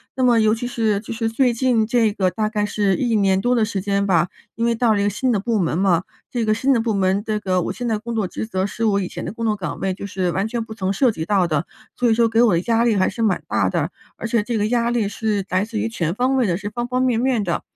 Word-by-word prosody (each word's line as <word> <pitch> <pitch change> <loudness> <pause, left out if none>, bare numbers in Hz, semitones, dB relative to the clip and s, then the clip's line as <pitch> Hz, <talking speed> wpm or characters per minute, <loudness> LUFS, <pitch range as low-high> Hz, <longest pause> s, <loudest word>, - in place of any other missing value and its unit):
那 260 - 0
么 240 -2 +4
尤 215 0 +3
其 230 - -5
是 220 -4 0
就 215 +2 -7
是 225 0 -1
最 245 +2 +2
近 235 -2 +2
这 230 -1 +2
个 190 -3 0
大 215 +4 -1
概 210 -1 -1
是 205 -2 +1
1 235 0 0
年 195 -2 +3
多 245 +5 +1
的 235 -3 +2
时 210 -2 -2
间 200 +1 0
吧， 175 -2 +2 0.3
因 230 - -1
为 235 - +2
到 230 -1 +2
了 - - 0
一 - - +1
个 205 - +2
新 250 +5 0
的 215 - +1
部 225 +2 0
门 165 -3 0
嘛， 180 -3 +3 0.3
这 240 -2 -1
个 215 - +1
新 265 +5 +2
的 235 - +2
部 225 -2 -1
门， 195 +1 +1
这 215 -2 -2
个 185 -3 0
我 - - -2
现 245 - -4
在 220 -2 0
工 235 +1 -5
作 215 -4 0
职 220 - -5
责 190 -3 -1
是 220 +3 -4
我 200 -2 +2
以 185 - -2
前 - - -7
的 175 - -4
工 230 +2 -5
作 215 -1 +1
岗 190 -4 -5
位 190 - -1
就 200 +2 -7
是 185 -2 -1
完 195 +4 -1
全 230 0 -3
不 220 - -9
曾 195 -3 -2
涉 245 +5 +3
及 160 - -5
到 195 -1 +2
的， 155 -1 -1 0.3
所 245 - +1
以 220 - +3
说 230 0 +3
给 225 +1 +2
我 230 -5 +4
的 170 - +2
压 230 +3 +1
力 235 -2 +2
还 185 -1 +2
是 230 - -4
蛮 210 -5 +1
大 - - +1
的。 - - -1 0.3
而 - - -4
且 230 -1 +1
这 230 +2 -2
个 205 - +1
压 235 +1 +1
力 235 -4 0
是 205 -1 -2
来 185 +1 +1
自 220 +1 -5
于 215 +1 0
全 175 -7 -2
方 255 +4 +1
位 255 -4 +2
的， 170 -2 0
是 205 +1 -6
方 240 +2 -3
方 250 +1 -1
面 245 -3 +2
面 250 -3 +1
的。 175 -3 -1
215 Hz, 330 characters per minute, -21 LUFS, 195-235 Hz, 0.3 s, 么